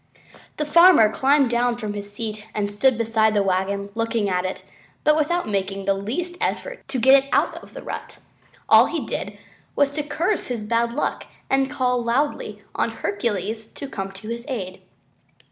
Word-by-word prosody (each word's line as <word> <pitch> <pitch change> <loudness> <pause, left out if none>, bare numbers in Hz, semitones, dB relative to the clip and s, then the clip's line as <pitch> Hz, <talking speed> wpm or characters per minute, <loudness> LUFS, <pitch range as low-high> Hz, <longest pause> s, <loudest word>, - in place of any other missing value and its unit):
The 300 - -1
farmer 335 - +7
climbed 275 +1 +3
down 240 0 +1
from 215 -3 -4
his 205 0 -6
seat 215 0 -5
and 205 -1 -1
stood 240 +4 +2
beside 220 -1 +2
the 205 - +3
wagon 195 +1 -1
looking 225 -2 -1
at 180 0 0
it 185 - -4 0.4
but 305 - +5
without 330 +3 0
making 195 -1 -2
the 195 - +3
least 275 - -4
effort - - -2
to 270 -1 -3
get 265 +3 +6
it - - -16
out - - +1
of - - -16
the - - -8
rut. - - -7 0.5
All - - +7
he - - -3
did - - -5 0.4
was 285 -1 +3
to 300 +1 -2
curse 335 +7 -1
his 240 -4 -3
bad 235 +2 +1
luck 295 - -2 0.2
and 270 0 +2
call 250 -2 0
loudly 260 +6 -1
on - - 0
Hercules 220 - -3
to 280 - -7
come 195 -7 -5
to 195 +3 -10
his 235 +2 -5
aid. 190 -7 -5
230 Hz, 180 wpm, -23 LUFS, 205-275 Hz, 0.5 s, farmer